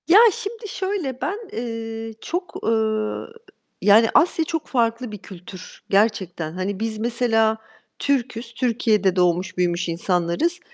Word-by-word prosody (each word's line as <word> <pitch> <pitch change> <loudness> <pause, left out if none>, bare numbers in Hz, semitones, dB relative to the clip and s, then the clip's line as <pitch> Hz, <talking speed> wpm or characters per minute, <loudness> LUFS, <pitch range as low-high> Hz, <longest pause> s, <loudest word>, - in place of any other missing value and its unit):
Ya, 365 +6 +8
şimdi 430 +4 -6
şöyle, 375 -11 -3
ben, 410 +3 -2
eee, 225 -1 -5
çok, 360 +2 -4
eee, - - +1 1.1
yani, 215 +2 +6
Asya 325 0 +4
çok 325 -1 -3
farklı 235 -1 0
bir 210 - -6
kültür 185 -1 -11
gerçekten. 195 -6 +1
Hani, 190 +2 -3
biz 220 0 -2
mesela, 225 -1 +2 0.4
Türk'üz. 245 -4 -1
Türkiye'de 220 -6 +2
doğmuş 180 +1 +1
büyümüş 175 -1 0
insanlarız 180 - 0
225 Hz, 125 wpm, -23 LUFS, 190-260 Hz, 1.1 s, Ya